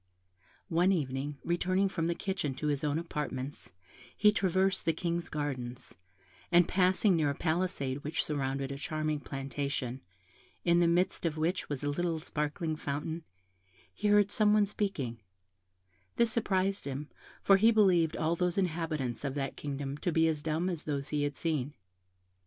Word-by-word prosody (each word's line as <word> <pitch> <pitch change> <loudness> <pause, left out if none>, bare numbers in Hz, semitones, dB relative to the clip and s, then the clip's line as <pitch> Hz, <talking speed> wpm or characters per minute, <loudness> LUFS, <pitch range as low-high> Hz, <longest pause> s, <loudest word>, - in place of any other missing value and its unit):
One 175 +3 +3
evening, 140 -4 -1
returning 185 +3 +1
from 165 -4 -1
the 170 - 0
kitchen 190 -9 -2
to 145 - -5
his 145 0 0
own 150 0 +1
apartments, 150 -4 -4 0.5
he 210 0 +6
traversed 190 -1 +1
the 165 - +2
King's 170 0 -2
gardens, 130 -4 -4 0.6
and 175 -1 +6
passing 185 +1 +3
near 155 -3 +2
a 140 - -1
palisade 155 -5 -1
which 150 +2 -1
surrounded 135 -2 -2
a 140 - -5
charming 155 0 -1
plantation, 135 -2 -4 0.6
in 170 0 +5
the 175 - +4
midst 175 +2 +1
of 160 -2 -1
which 165 +4 -1
was 145 -1 -3
a 145 - 0
little 170 +2 -1
sparkling 155 +1 -2
fountain, 155 +3 -4 0.7
he 210 - -2
heard 205 -1 +5
some 210 0 +4
one 210 -1 +5
speaking; 190 - -2 1.0
this 235 -1 +3
surprised 195 -3 +1
him, 140 +1 -4 0.4
for 195 - +6
he 220 +4 +6
believed 185 -8 +4
all 165 +1 +1
the 180 +1 +1
inhabitants 160 - -1
of 140 -1 -2
that 135 -2 -2
kingdom 140 0 -4
to 175 - 0
be 160 0 +3
as 155 -2 0
dumb 160 +3 -1
as 175 -4 -3
those 140 -1 -2
he 150 -1 0
had 145 0 -1
seen. 150 -3 -1
160 Hz, 165 wpm, -31 LUFS, 145-180 Hz, 1.0 s, he